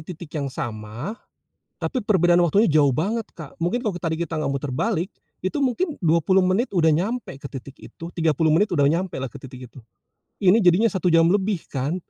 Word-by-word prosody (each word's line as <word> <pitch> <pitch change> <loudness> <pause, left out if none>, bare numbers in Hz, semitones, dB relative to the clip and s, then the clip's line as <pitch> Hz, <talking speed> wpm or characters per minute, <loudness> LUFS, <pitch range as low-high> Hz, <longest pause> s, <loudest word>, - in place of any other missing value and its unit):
titik 165 -1 -11
yang 145 -3 -2
sama, 115 - -5 0.7
tapi 255 - -2
perbedaan 175 -5 +3
waktunya 195 +7 +3
jauh 150 -3 +4
banget 205 - -1
Kak, 155 -4 -10
mungkin 240 +9 -1
kalau 210 - -1
tadi 165 -2 -1
kita 165 -1 -3
nggak 150 - -1
muter 140 0 -3
balik, 190 - -1 0.3
itu 190 +10 -1
mungkin 290 +6 0
20 170 +3 +3
menit 190 +7 +1
udah 160 -3 +4
nyampe 190 - -2
ke 140 - -8
titik 135 0 -9
itu, - - -12
30 160 -1 +1
menit 165 +7 +4
udah 145 -3 +3
nyampelah 165 -5 -2
ke 140 - -10
titik 130 -2 -11
itu, - - -15 0.6
ini 190 +2 +5
jadinya 180 +6 +4
1 185 -3 0
jam 165 0 +5
lebih 195 -1 +1
kan. 145 +7 -2
170 Hz, 190 wpm, -23 LUFS, 145-195 Hz, 0.7 s, ini